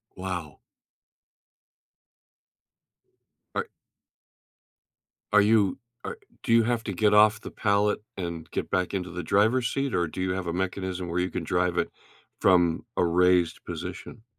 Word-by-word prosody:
Wow. 90 -6 -5 3.0
Are - - -1 1.6
Are 105 0 +6
you 105 -2 +3 0.3
ar 475 - -5 0.2
do 125 - -3
you 115 0 +6
have 115 0 0
to 100 - -3
get 105 +3 +2
off 105 +1 +6
the - - -8
pallet 105 0 +1 0.2
and 85 -2 -5
get - - -3
back 90 0 0
into 90 -3 -3
the 90 - -4
driver's 110 +7 +2
seat, 135 -2 -1
or 85 -1 +1
do 85 - -6
you 95 0 0
have 90 -2 -3
a 85 - -1
mechanism 95 -1 -3
where 85 +1 -1
you 90 +1 0
can 85 - -4
drive 90 +1 0
it - - 0 0.5
from 85 -3 +3
a 90 - +3
raised 90 -1 +3
position? 115 - -7
95 Hz, 145 wpm, -27 LUFS, 90-105 Hz, 3.0 s, Are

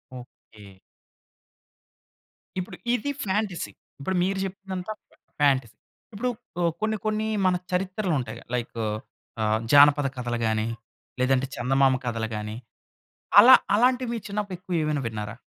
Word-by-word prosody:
Okay. 105 -5 -14 1.8
ఇప్పుడు 180 - -6 0.2
ఇది 285 +4 -1
fantasy. 195 -2 -1 0.3
ఇప్పుడు 185 +7 -2
మీరు 190 +1 0
చెప్పిందంతా 190 0 -6 0.2
ఫా - - -25 0.3
ఫాంటసీ. 135 -5 +3 0.4
ఇప్పుడు 245 +5 -1 0.5
కొన్ని 215 0 0
కొన్ని 215 0 0 0.2
మన 185 -1 +4 0.2
చరిత్రలుంటయి 180 - -1
లైక్ 120 -1 -4 0.6
ఆహ్, 110 0 +2
జానపద 145 0 +7
కథలు 120 -1 -2
గాని, 110 0 0 0.5
లేదంటే 130 +1 +2
చందమామ 135 +2 +3
కథలు 115 -2 -2
గాని, 105 0 -5 0.8
అలా 255 +5 +11 0.2
అలాంటివి 250 +2 +3
మీరు 230 -4 -4
చిన్నప్పుడు 200 -2 -3
ఎక్కువేమైనా 155 -6 -1
విన్నారా? 105 0 -5
155 Hz, 110 wpm, -26 LUFS, 120-200 Hz, 1.8 s, అలా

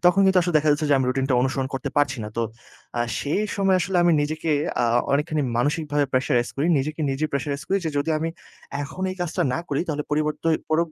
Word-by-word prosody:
তখন 180 +2 +5
কিন্তু 190 -1 +5
আসলে 175 -1 -2
দেখা 150 +1 0
যাচ্ছে 150 +1 0
যে, - - +6
আমি 130 - +1
রুটিনটা 135 0 +1
অনুসরণ 130 0 0
করতে 135 +1 -3
পারছি 145 -2 +2
না - - -5
তো, 115 - +1 0.6
আ - - +1 0.2
সেই 155 +9 0
সময় 195 -1 +3
আসলে 185 +1 -1
আমি 175 -1 +4
নিজেকে 155 +2 -2 0.3
আ - - +3 0.3
অনেকখানি 150 +1 +1
মানসিকভাবে 145 +2 +1
pressurize 130 -2 +1
করি। 145 - +1
নিজেকে 155 +4 -3
নিজে 135 +3 -1
pressurize 140 +2 -2
করি 195 - +2
যে, 160 - 0
"যদি 145 +3 0
আমি 165 +1 -1 0.5
এখন 165 +6 -6
এই 185 - -6
কাজটা 175 +1 -1
না - - -1
করি 140 - 0
তাহলে 150 -1 -1
পরিবর্তোই 155 +2 +1
পর 155 - +2
150 Hz, 215 wpm, -24 LUFS, 140-165 Hz, 0.6 s, যে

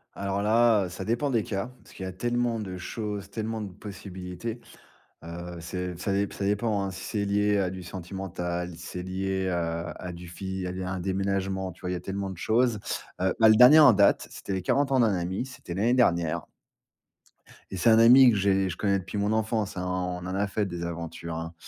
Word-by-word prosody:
Alors 100 0 -2
là, 110 -1 +4
heu, - - -6
ça 90 +2 -6
dépend 120 +6 0
des 115 -4 +2
cas 100 +5 -3
parce - - -17
qu'il 95 - -6
y - - -3
a - - -4
tellement 120 +3 -1
de 95 -3 -5
choses, 105 +1 -5
tellement 110 0 -3
de 100 -3 -6
possibilités. 95 +2 -7 0.6
Heu, 85 +1 -7
c'est 90 +1 -4
ça 95 +3 -2
dép 100 +1 0
ça - - -5
dépend 105 0 0
hein, 95 - -3
si 95 - -8
c'est 105 -2 -2
lié 105 +1 +2
à 95 -2 +1
du 95 0 -7
sentimental, 90 -1 -5
c'est 90 +2 -7
lié 95 0 -2
à 85 -1 -2
à 90 - -7
du 90 0 -10
fi 95 +1 -5
à - - -3 0.2
à - - -3
un - - -4
déménagement, 95 0 -1
tu 85 - -18
vois? 90 - -3
Il - - -1
y - - -1
a 90 - -5
tellement 100 0 -4
de 95 - -7
choses. 115 +2 +2 0.4
Heu, 95 0 +2
bah 110 - +7
le 110 - +7
dernier 125 +7 +9
en 145 -6 +8
date, 100 0 +3
c'était - - -8
les 95 - -1
40 135 +9 +1
ans 135 - +3
d'un 115 -4 +4
ami, 90 +6 -2
c'était 125 -9 -9
l'année 110 +7 +2
dernière 85 -10 +2 1.2
et 95 - -4
c'est 105 - +3
un 110 0 +6
ami 125 +2 +8
que 105 - +1
j'ai 95 -1 +2
je 85 - -5
connais 100 -2 +1
depuis 95 +3 -6
mon 100 +1 +1
enfance 110 -2 -1
hein, 90 - -2
on 90 -1 -3
en 95 +1 -3
a 100 +1 +1
fait 105 +1 -1
des 85 -2 -5
aventures 85 -1 -5
hein. 80 +1 -5
95 Hz, 225 wpm, -27 LUFS, 90-110 Hz, 1.2 s, dernier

